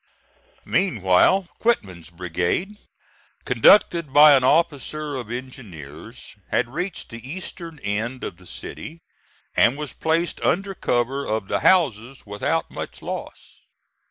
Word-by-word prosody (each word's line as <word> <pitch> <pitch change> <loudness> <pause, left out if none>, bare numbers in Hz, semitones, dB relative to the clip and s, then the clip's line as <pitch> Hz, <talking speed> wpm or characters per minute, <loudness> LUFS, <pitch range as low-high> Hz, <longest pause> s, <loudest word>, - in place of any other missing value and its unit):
Meanwhile 170 - +3
Quitman's 95 - -1
brigade, 90 - -2 0.7
conducted 170 -7 +4
by 150 +1 +8
an 135 -2 +4
officer 150 0 0
of 125 -4 -6
engineers, 110 - -9
had - - 0
reached 180 +3 -4
the 115 +2 -10
eastern 170 -1 -8
end 110 +5 -3
of 85 - -5
the 90 -1 -17
city, 150 - -9 0.5
and 120 +4 +4
was 150 -1 -6
placed 165 +2 -1
under 195 +2 0
cover 130 -3 -1
of 110 -5 -2
the - - 0
houses 135 - +2
without 105 0 -2
much - - -7
loss. - - -8
130 Hz, 120 wpm, -23 LUFS, 105-165 Hz, 0.7 s, by